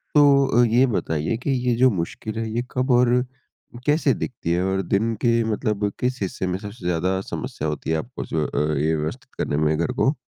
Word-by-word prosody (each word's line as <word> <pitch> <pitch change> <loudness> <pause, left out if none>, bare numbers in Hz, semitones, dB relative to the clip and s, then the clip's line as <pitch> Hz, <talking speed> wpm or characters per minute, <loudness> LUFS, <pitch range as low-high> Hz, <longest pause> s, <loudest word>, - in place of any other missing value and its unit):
तो 140 -2 +6 0.2
अ, - - +6
ये 120 +4 +4
बताइए 80 -2 -1
कि 135 +3 -2 0.2
ये 120 - +3
जो 130 +2 +5
मुश्किल 105 +5 -4
है, 115 -1 -2
ये 120 +2 -1
कब 130 +1 0
और 125 +1 +4 0.6
कैसे 145 -3 +3
दिखती 85 -9 -4
है? 90 +1 +1
और 95 0 0
दिन 110 +5 0
के 115 -1 +3
मतलब 105 -2 -1
किस 125 -2 -1
हिस्से 95 -1 -2
में 90 +1 -1
सबसे 105 -3 -9
ज़्यादा 90 +2 0
समस्या 80 -4 -5
होती 75 +1 -4
है 80 - +2
आपको 120 +10 -6
जो 80 -2 -1
अ, - - -2 0.2
ये 80 +3 +1
व्यवस्थित 75 0 -5
करने 70 - -1
में 75 0 +2
घर 85 +9 0
को? 135 +3 +1
110 Hz, 210 wpm, -23 LUFS, 85-125 Hz, 0.6 s, तो